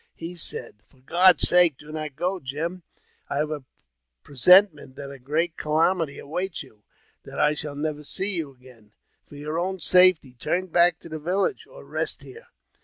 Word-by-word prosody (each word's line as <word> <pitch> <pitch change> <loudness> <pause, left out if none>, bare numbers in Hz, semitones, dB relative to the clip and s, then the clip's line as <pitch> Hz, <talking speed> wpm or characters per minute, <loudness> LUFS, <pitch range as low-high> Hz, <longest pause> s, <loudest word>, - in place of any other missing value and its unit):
He 170 +2 -8
said, 120 -9 -3
'' - - -39
For 135 - -28
God's 175 +5 +5
sake, 175 -6 +4
do 150 +1 -13
not 155 -3 -6
go, 185 +5 -2
Jim! 160 +6 -5 0.5
I - - -3
have 150 +1 -1
a 150 -3 -5 0.6
presenti 180 - +5
ment 140 -3 -15
that 140 -1 -9
a 140 - -11
great 160 +6 -2
calamity 160 0 0
awaits 175 +4 -5
you 110 -6 -21 0.2
— - - -39
that - - -10
I 150 0 +3
shall 150 -1 -5
never 150 0 -4
see 195 +7 -2
you 160 -5 -3
again. 125 -5 -20 0.3
For - - -14
your 150 +3 -4
own 190 +2 -3
safety, 180 -6 +4
turn 175 +9 -2
back 170 0 +3
to - - -12
the 155 0 -6
village, 185 - -2
or - - -14
rest - - -4
here." 455 +2 -14
155 Hz, 190 wpm, -24 LUFS, 140-180 Hz, 0.6 s, God's